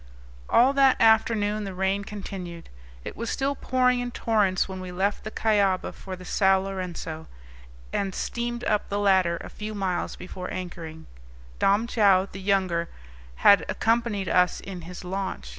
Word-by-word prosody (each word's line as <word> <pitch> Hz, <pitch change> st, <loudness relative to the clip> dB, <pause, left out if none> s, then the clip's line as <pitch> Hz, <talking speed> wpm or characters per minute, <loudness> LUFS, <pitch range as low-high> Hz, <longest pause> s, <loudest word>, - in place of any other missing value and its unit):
All 255 Hz, +4 st, +5 dB
that 270 Hz, -2 st, +4 dB
afternoon 215 Hz, -1 st, +3 dB
the 195 Hz, -2 st, -6 dB
rain 190 Hz, +2 st, 0 dB
continued. 185 Hz, -5 st, -7 dB, 0.4 s
It -, -, -6 dB
was 230 Hz, +1 st, -4 dB
still 275 Hz, +1 st, 0 dB
pouring 255 Hz, -2 st, +1 dB
in 245 Hz, 0 st, -3 dB
torrents 210 Hz, -6 st, +1 dB
when 190 Hz, -1 st, -6 dB
we 185 Hz, -1 st, -7 dB
left 195 Hz, +3 st, -1 dB
the 215 Hz, -, -4 dB
Cuyaba 205 Hz, -4 st, +1 dB
for 190 Hz, -1 st, -8 dB
the 185 Hz, 0 st, -12 dB
Sao 190 Hz, +1 st, +3 dB
Lourenco 180 Hz, -4 st, -5 dB, 0.7 s
and 195 Hz, -2 st, -1 dB
steamed 240 Hz, 0 st, -3 dB
up 210 Hz, -3 st, 0 dB
the 200 Hz, -, -1 dB
latter 190 Hz, -4 st, +3 dB
a -, -, -7 dB
few 215 Hz, 0 st, -6 dB
miles 185 Hz, -3 st, -2 dB
before 180 Hz, 0 st, -7 dB
anchoring; 165 Hz, -3 st, -7 dB, 0.5 s
Dom 205 Hz, +3 st, +3 dB
Joao 200 Hz, -5 st, +4 dB
the 190 Hz, -, -8 dB
younger 185 Hz, -4 st, +1 dB, 0.6 s
had 200 Hz, -, +8 dB
accompanied 225 Hz, -4 st, 0 dB
us 180 Hz, -1 st, +2 dB
in 185 Hz, -3 st, -8 dB
his 180 Hz, -, -8 dB
launch. 185 Hz, -, -4 dB
195 Hz, 160 wpm, -26 LUFS, 185-215 Hz, 0.7 s, had